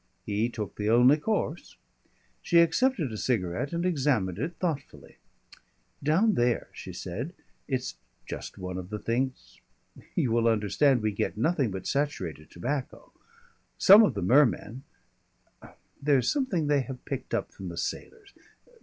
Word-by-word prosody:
He 105 Hz, +3 st, 0 dB
took 105 Hz, -6 st, -6 dB
the 105 Hz, 0 st, -1 dB
only 125 Hz, +5 st, +6 dB
course. 215 Hz, +8 st, -3 dB, 0.6 s
She 170 Hz, -, +2 dB
accepted 170 Hz, -, +3 dB
a 110 Hz, -, -5 dB
cigarette 100 Hz, +1 st, -1 dB
and 170 Hz, +1 st, -2 dB
examined 130 Hz, -, +1 dB
it 160 Hz, +7 st, -3 dB
thoughtfully. 160 Hz, -5 st, -5 dB, 0.8 s
"Down 185 Hz, +10 st, +3 dB
there," 120 Hz, -4 st, +1 dB
she -, -, -8 dB
said, -, -, -5 dB, 0.3 s
"it's -, -, -3 dB, 0.3 s
just -, -, -7 dB
one 90 Hz, 0 st, -5 dB
of 90 Hz, 0 st, -8 dB
the 105 Hz, -, -4 dB
things 125 Hz, +4 st, -3 dB, 0.5 s
You 120 Hz, -, +1 dB
will 115 Hz, 0 st, +2 dB
understand 115 Hz, +4 st, +2 dB
we 110 Hz, -, +1 dB
get 100 Hz, -, -2 dB
nothing 140 Hz, 0 st, +1 dB
but 95 Hz, -1 st, -6 dB
saturated 95 Hz, -, -2 dB
tobacco. 130 Hz, +10 st, -5 dB, 0.7 s
Some 200 Hz, +3 st, +9 dB
of 215 Hz, -, +3 dB
the 100 Hz, -, -2 dB
mermen 125 Hz, +1 st, +3 dB, 1.2 s
There's 140 Hz, -4 st, +3 dB
something 260 Hz, -, 0 dB
they 145 Hz, -1 st, +2 dB
have 130 Hz, -1 st, -8 dB
picked -, -, -4 dB
up -, -, -3 dB
from 95 Hz, -2 st, -8 dB
the 85 Hz, -, -8 dB
sailors. 410 Hz, -, -5 dB
130 Hz, 145 wpm, -28 LUFS, 105-155 Hz, 1.2 s, Some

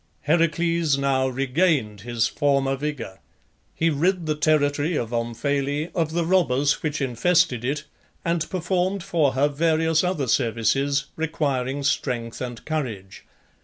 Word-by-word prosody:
Heracles 165 Hz, 0 st, +2 dB
now 135 Hz, -1 st, +1 dB
regained 130 Hz, -, 0 dB
his 120 Hz, 0 st, 0 dB
former 140 Hz, -1 st, +1 dB
vigour. 135 Hz, -9 st, -5 dB, 0.6 s
He 165 Hz, 0 st, +2 dB
rid 175 Hz, +4 st, +1 dB
the 155 Hz, -, +1 dB
territory 150 Hz, +1 st, +1 dB
of 120 Hz, -4 st, -2 dB
Omphale 140 Hz, +6 st, -1 dB
of 160 Hz, -2 st, -1 dB
the 170 Hz, 0 st, 0 dB
robbers 145 Hz, -6 st, +2 dB
which 150 Hz, -2 st, -2 dB
infested 135 Hz, +1 st, +2 dB
it 140 Hz, +4 st, -2 dB, 0.4 s
and 170 Hz, -2 st, 0 dB
performed 185 Hz, +1 st, -1 dB
for 155 Hz, -6 st, +1 dB
her 140 Hz, +2 st, +3 dB
various 160 Hz, +2 st, +1 dB
other 180 Hz, -7 st, -1 dB
services 135 Hz, +4 st, +1 dB
requiring 140 Hz, -4 st, -1 dB
strength 120 Hz, -4 st, -1 dB
and 120 Hz, -2 st, -6 dB
courage. 115 Hz, -12 st, -4 dB
145 Hz, 130 wpm, -24 LUFS, 130-165 Hz, 0.6 s, her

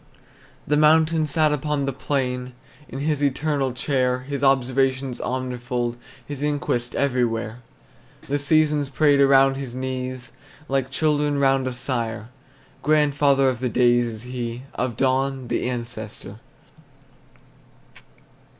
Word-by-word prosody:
The 150 Hz, -, +1 dB
mountain 155 Hz, +1 st, +4 dB
sat 155 Hz, +1 st, +2 dB
upon 150 Hz, -1 st, -1 dB
the 135 Hz, -, -2 dB
plain 125 Hz, -2 st, -2 dB, 0.4 s
In 135 Hz, -, -6 dB
his 150 Hz, -1 st, 0 dB
eternal 140 Hz, -1 st, 0 dB
chair, 125 Hz, -1 st, 0 dB
His 140 Hz, +1 st, -5 dB
observation 135 Hz, 0 st, +2 dB
omnifold, 125 Hz, -1 st, -3 dB, 0.3 s
His 145 Hz, 0 st, -6 dB
inquest 140 Hz, -5 st, -1 dB
everywhere. 120 Hz, -4 st, -1 dB, 0.7 s
The 145 Hz, +1 st, 0 dB
seasons 150 Hz, -1 st, +2 dB
prayed 145 Hz, 0 st, +3 dB
around 135 Hz, 0 st, +5 dB
his 130 Hz, -3 st, -6 dB
knees, 130 Hz, -1 st, -4 dB, 0.4 s
Like 135 Hz, -1 st, 0 dB
children 145 Hz, +1 st, +1 dB
round 135 Hz, -1 st, +2 dB
a 130 Hz, -, -3 dB
sire: 120 Hz, -3 st, -3 dB, 0.5 s
Grandfather 145 Hz, -2 st, +3 dB
of 130 Hz, -2 st, 0 dB
the 125 Hz, 0 st, -1 dB
days 120 Hz, 0 st, +3 dB
is 110 Hz, -2 st, -7 dB
he, 125 Hz, -1 st, -5 dB
Of 125 Hz, -2 st, -3 dB
dawn 135 Hz, -1 st, 0 dB
the -, -, -1 dB
ancestor. 115 Hz, -4 st, -6 dB
135 Hz, 120 wpm, -23 LUFS, 125-145 Hz, 0.7 s, around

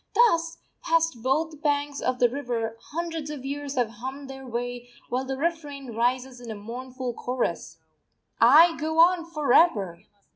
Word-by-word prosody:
Thus, 335 Hz, -9 st, +3 dB, 0.2 s
past 330 Hz, -7 st, +1 dB
both 305 Hz, +4 st, 0 dB
banks 290 Hz, -1 st, 0 dB
of 255 Hz, 0 st, 0 dB
the 245 Hz, -, +5 dB
river, 235 Hz, -3 st, -3 dB
hundreds 325 Hz, -1 st, -4 dB
of 285 Hz, -3 st, -7 dB
years 285 Hz, 0 st, -4 dB
have 240 Hz, -3 st, +1 dB
hummed 270 Hz, +2 st, -6 dB
their 265 Hz, -1 st, -9 dB
way, 245 Hz, 0 st, -4 dB, 0.2 s
while 255 Hz, +2 st, -1 dB
the 265 Hz, 0 st, -3 dB
refrain 290 Hz, -5 st, -3 dB
rises 250 Hz, +2 st, -1 dB
in 240 Hz, -, -9 dB
a 220 Hz, -, -4 dB
mournful 250 Hz, +4 st, -6 dB
chorus: 250 Hz, +1 st, -3 dB, 0.6 s
_I 310 Hz, +7 st, +7 dB
go 315 Hz, +1 st, -2 dB
on 345 Hz, 0 st, +5 dB
for 300 Hz, -6 st, 0 dB
ever! 200 Hz, -, +3 dB
270 Hz, 155 wpm, -26 LUFS, 245-310 Hz, 0.6 s, I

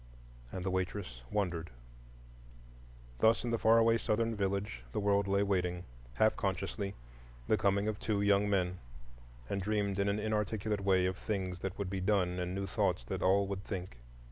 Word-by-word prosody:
And 95 Hz, -1 st, -5 dB
the 95 Hz, -, 0 dB
waitress 90 Hz, -9 st, -3 dB
wondered. 85 Hz, -5 st, -1 dB, 1.5 s
Thus 115 Hz, +1 st, +4 dB
in 120 Hz, -, -2 dB
the 115 Hz, -, +1 dB
far 115 Hz, +1 st, +5 dB
away 115 Hz, 0 st, +4 dB
Southern 115 Hz, +1 st, 0 dB
village 100 Hz, -, -2 dB
the -, -, 0 dB
world 100 Hz, -1 st, +2 dB
lay 100 Hz, +1 st, +2 dB
waiting, 90 Hz, -3 st, 0 dB, 0.3 s
half 110 Hz, -, +4 dB
consciously, 100 Hz, +1 st, -2 dB, 0.5 s
the -, -, +4 dB
coming 100 Hz, 0 st, +1 dB
of 110 Hz, -1 st, -2 dB
two 105 Hz, -2 st, 0 dB
young 100 Hz, 0 st, +3 dB
men, 90 Hz, -2 st, 0 dB, 0.7 s
and 100 Hz, -, -2 dB
dreamed 100 Hz, -1 st, 0 dB
in 100 Hz, 0 st, +2 dB
an 100 Hz, -, +1 dB
inarticulate 105 Hz, -1 st, -1 dB
way 95 Hz, -2 st, +3 dB
of 95 Hz, +1 st, -1 dB
new -, -, -16 dB
things 95 Hz, -4 st, -2 dB
that 95 Hz, 0 st, -4 dB
would 100 Hz, -2 st, -3 dB
be 95 Hz, -1 st, -2 dB
done 90 Hz, -2 st, +1 dB
and 90 Hz, +1 st, -2 dB
new 100 Hz, 0 st, -2 dB
thoughts 95 Hz, -, 0 dB
that -, -, -4 dB
all 100 Hz, +2 st, +4 dB
would 100 Hz, 0 st, -4 dB
think. 90 Hz, -, -6 dB
100 Hz, 180 wpm, -33 LUFS, 95-105 Hz, 1.5 s, far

